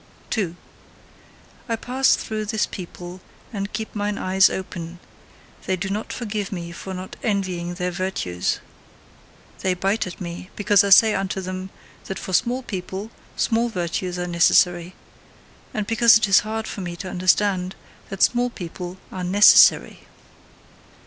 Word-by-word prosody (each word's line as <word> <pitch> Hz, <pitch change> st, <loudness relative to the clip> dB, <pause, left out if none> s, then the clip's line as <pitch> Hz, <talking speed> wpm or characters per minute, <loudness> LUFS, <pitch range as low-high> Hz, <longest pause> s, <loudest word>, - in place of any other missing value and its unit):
2. 185 Hz, -7 st, -1 dB, 1.1 s
I 230 Hz, -, +1 dB
pass 255 Hz, +4 st, +2 dB
through 215 Hz, -1 st, -4 dB
this 220 Hz, 0 st, 0 dB
people 180 Hz, 0 st, -9 dB, 0.3 s
and 200 Hz, -1 st, -4 dB
keep 220 Hz, 0 st, -5 dB
mine 205 Hz, 0 st, -2 dB
eyes 190 Hz, +1 st, +4 dB
open: 175 Hz, -2 st, -6 dB, 0.7 s
they 190 Hz, -, +1 dB
do 190 Hz, +2 st, -4 dB
not 210 Hz, +2 st, -3 dB
forgive 210 Hz, -4 st, -4 dB
me 170 Hz, -3 st, -5 dB
for 190 Hz, +3 st, -8 dB
not 185 Hz, +1 st, -7 dB
envying 185 Hz, -5 st, -2 dB
their 180 Hz, 0 st, -2 dB
virtues. 175 Hz, -, -2 dB, 1.0 s
They 185 Hz, -1 st, 0 dB
bite 195 Hz, +3 st, 0 dB
at 180 Hz, -, -9 dB
me, 175 Hz, +1 st, -7 dB
because 205 Hz, -1 st, +4 dB
I 200 Hz, -, 0 dB
say 215 Hz, +3 st, +7 dB
unto 195 Hz, -1 st, -2 dB
them 185 Hz, 0 st, -5 dB, 0.4 s
that 190 Hz, -, -5 dB
for 190 Hz, -, -6 dB
small 245 Hz, +6 st, +1 dB
people, 190 Hz, +1 st, -6 dB, 0.2 s
small 235 Hz, +1 st, +1 dB
virtues 180 Hz, -2 st, -3 dB
are 180 Hz, -, -2 dB
necessary 175 Hz, +1 st, +3 dB, 0.8 s
and 215 Hz, -2 st, -2 dB
because 230 Hz, +1 st, +6 dB
it 215 Hz, -1 st, 0 dB
is 195 Hz, -, +6 dB
hard 220 Hz, +1 st, -4 dB
for 200 Hz, -, -6 dB
me 175 Hz, -1 st, -5 dB
to 185 Hz, +2 st, -7 dB
understand 185 Hz, 0 st, +1 dB, 0.3 s
that 195 Hz, -1 st, 0 dB
small 245 Hz, 0 st, +3 dB
people 180 Hz, -3 st, -7 dB
are 185 Hz, -, -5 dB
NECESSARY! 200 Hz, +4 st, +6 dB
190 Hz, 150 wpm, -23 LUFS, 180-215 Hz, 1.1 s, say